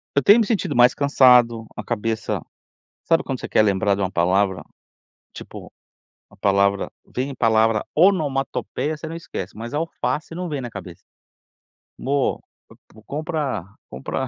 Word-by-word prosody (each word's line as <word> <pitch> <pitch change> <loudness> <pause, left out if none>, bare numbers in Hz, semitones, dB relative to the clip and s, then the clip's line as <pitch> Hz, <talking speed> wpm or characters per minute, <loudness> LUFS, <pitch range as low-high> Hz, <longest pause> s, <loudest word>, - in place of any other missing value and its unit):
Eu 140 - +3
tenho 205 - +7
me 225 - +3
sentido 215 -2 -1
mais 120 +1 +6
cansado, 125 -5 +4
a - - -4
cabeça. 115 -1 -2 0.6
Sabe 165 -1 +2
quando 130 -2 -4
você - - -7
quer - - +4
lembrar 100 -1 +2
de 100 - -4
uma 95 -1 -1
palavra? 95 +1 +1 0.7
Tipo, - - -10 0.6
a - - -19
palavra 100 0 +1
vem 130 +2 -4
palavra 110 -2 +2
onomatopeia 155 -3 +1
você 155 - -7
não 165 - -6
esquece, 100 - -7
mas 115 +4 -7
alface 160 0 -3
não 180 +1 -4
vem 145 -2 -3
na 120 - -5
cabeça. 90 -4 -9 1.0
"Mô, 140 +1 0 0.3
v - - -16 0.2
vou, 110 - -17
compra, 150 - -3 0.2
compra, 130 - -4
125 Hz, 150 wpm, -22 LUFS, 100-150 Hz, 1.0 s, tenho